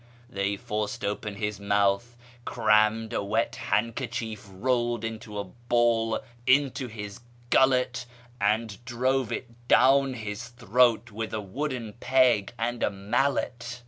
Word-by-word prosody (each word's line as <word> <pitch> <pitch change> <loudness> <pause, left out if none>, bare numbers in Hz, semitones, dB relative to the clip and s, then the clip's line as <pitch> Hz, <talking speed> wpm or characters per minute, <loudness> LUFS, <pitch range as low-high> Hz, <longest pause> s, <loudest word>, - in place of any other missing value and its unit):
They 100 +1 -1
forced 105 +4 -3
open 105 0 -3
his 105 0 -3
mouth, 100 +3 +1 0.3
crammed 110 +1 +2
a 100 - -1
wet 110 +3 0
handkerchief 110 -2 -2
rolled 120 +3 0
into 110 -2 -5
a 100 - -1
ball 120 +2 +1 0.3
into 135 0 +3
his 105 -3 -8 0.3
gullet, 125 -1 +3 0.3
and 110 +2 0
drove 130 0 0
it 120 0 -7
down 135 0 +5
his 110 +1 -5
throat 120 -1 +2
with 110 +1 -4
a - - -1
wooden 120 +2 -4
peg 125 -6 +3
and 120 +1 -2
a - - +3
mallet. 120 +4 -1
115 Hz, 125 wpm, -27 LUFS, 105-125 Hz, 0.3 s, down